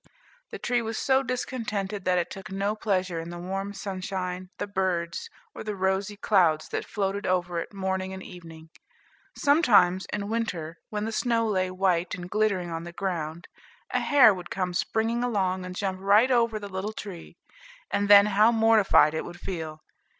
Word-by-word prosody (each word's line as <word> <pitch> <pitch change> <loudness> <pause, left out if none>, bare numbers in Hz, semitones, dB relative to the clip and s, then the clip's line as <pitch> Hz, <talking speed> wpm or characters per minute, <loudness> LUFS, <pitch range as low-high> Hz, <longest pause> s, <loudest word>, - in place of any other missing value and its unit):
The - - -6
tree 245 -1 0
was 225 -1 -4
so 265 0 +3
discontented, 220 -6 -3
that 180 -1 +2
it 175 -1 -1
took 195 +2 -8
no 200 +2 -1
pleasure 185 -5 -1
in 165 +1 -6
the 175 - -7
warm 195 +3 -4
sunshine, 185 -2 -4
the 205 - -2
birds, 185 -4 -2 0.2
or - - -7
the 210 -1 -4
rosy 190 +2 -1
clouds 175 -8 +2
that - - -3
floated 200 0 -2
over 180 -1 0
it - - -6
morning 190 -1 -2
and 190 0 -7
evening. 165 -2 -12 0.7
Sometimes, 210 - +4
in 205 -1 -3
winter, 180 -8 -3
when 210 0 -3
the 225 - -3
snow 230 0 +1
lay 185 -3 0
white 185 -1 0
and 180 -1 -9
glittering 200 -5 0
on 165 0 -4
the 175 - -8
ground, 170 -3 -4 0.4
a - - +1
hare 275 -7 +6
would 180 -2 -8
come 185 -2 -2
springing 225 +6 0
along, 190 -6 0
and 180 0 -7
jump 190 -1 -2
right 210 +6 +4
over 230 -3 +2
the 205 -1 -6
little 195 +2 -4
tree; 195 -6 -9 0.5
and 205 0 0
then 200 0 +9
how 210 +2 +4
mortified 220 -8 +5
it 160 - -2
would 175 0 -9
feel! 160 -4 -6
195 Hz, 180 wpm, -27 LUFS, 180-215 Hz, 0.7 s, then